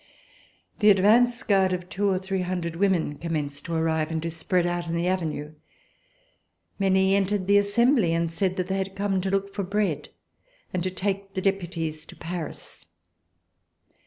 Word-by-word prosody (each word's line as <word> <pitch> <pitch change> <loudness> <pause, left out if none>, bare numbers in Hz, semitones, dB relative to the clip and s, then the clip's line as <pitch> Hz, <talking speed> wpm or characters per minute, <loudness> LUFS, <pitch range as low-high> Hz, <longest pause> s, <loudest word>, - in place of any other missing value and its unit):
The 210 -1 +6
advance 235 +6 +4
guard 190 -4 +3
of 180 -1 -4
two 200 +2 0
or 190 - +2
three 190 0 -2
hundred 175 -2 -3
women 175 -5 +1
commenced 145 -3 -3
to 170 - -3
arrive 160 -1 0
and 160 -1 -2
to 165 - -2
spread 175 +2 0
out 175 0 -2
in 165 - -2
the 170 +1 0
Avenue. 155 -5 -2 1.3
Many 190 0 +3
entered 200 -1 +1
the 200 +1 +5
Assembly 215 - +3
and 165 0 0
said 185 +2 0
that 185 -2 -2
they 190 +1 -1
had 190 0 -4
come 195 -1 0
to 190 - -2
look 195 0 -1
for 200 - -2
bread 200 +2 -1 0.6
and 180 - 0
to 185 - -1
take 195 +1 -3
the 190 - -1
Deputies 170 -5 -2
to - - -12
Paris. 170 -2 -7
185 Hz, 170 wpm, -26 LUFS, 170-195 Hz, 1.3 s, The